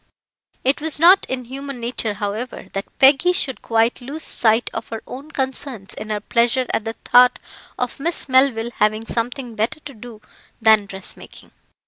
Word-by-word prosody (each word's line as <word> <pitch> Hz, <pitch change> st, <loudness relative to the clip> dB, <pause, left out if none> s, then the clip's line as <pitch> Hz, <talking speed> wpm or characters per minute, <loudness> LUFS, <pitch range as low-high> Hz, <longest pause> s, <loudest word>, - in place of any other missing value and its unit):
It 270 Hz, +3 st, +1 dB
was 315 Hz, -1 st, +1 dB
not 360 Hz, +4 st, +6 dB
in 260 Hz, -1 st, -3 dB
human 275 Hz, +1 st, -7 dB
nature, 235 Hz, -3 st, -3 dB
however, 210 Hz, +5 st, -5 dB
that 195 Hz, 0 st, -6 dB
Peggy 275 Hz, +7 st, +5 dB
should 265 Hz, -7 st, -2 dB
quite 230 Hz, +2 st, 0 dB
lose 285 Hz, +6 st, -7 dB
sight 225 Hz, +1 st, +2 dB
of 225 Hz, -, -5 dB
her 225 Hz, -1 st, -6 dB
own 275 Hz, +4 st, -10 dB
concerns 265 Hz, -7 st, -2 dB
in 215 Hz, -, -8 dB
her 210 Hz, -1 st, -2 dB
pleasure 235 Hz, +4 st, +1 dB
at 220 Hz, -, -1 dB
the 225 Hz, -, -3 dB
thought 250 Hz, 0 st, +5 dB, 0.4 s
of 250 Hz, +1 st, -4 dB
Miss 335 Hz, +2 st, 0 dB
Melville 260 Hz, -3 st, +2 dB
having 215 Hz, +1 st, +1 dB
something 240 Hz, +1 st, -4 dB
better 220 Hz, +7 st, -2 dB
to 285 Hz, -, -10 dB
do 230 Hz, -1 st, -12 dB, 0.4 s
than 220 Hz, -2 st, +4 dB
dressmaking. 190 Hz, -1 st, +1 dB
245 Hz, 165 wpm, -20 LUFS, 220-270 Hz, 0.4 s, not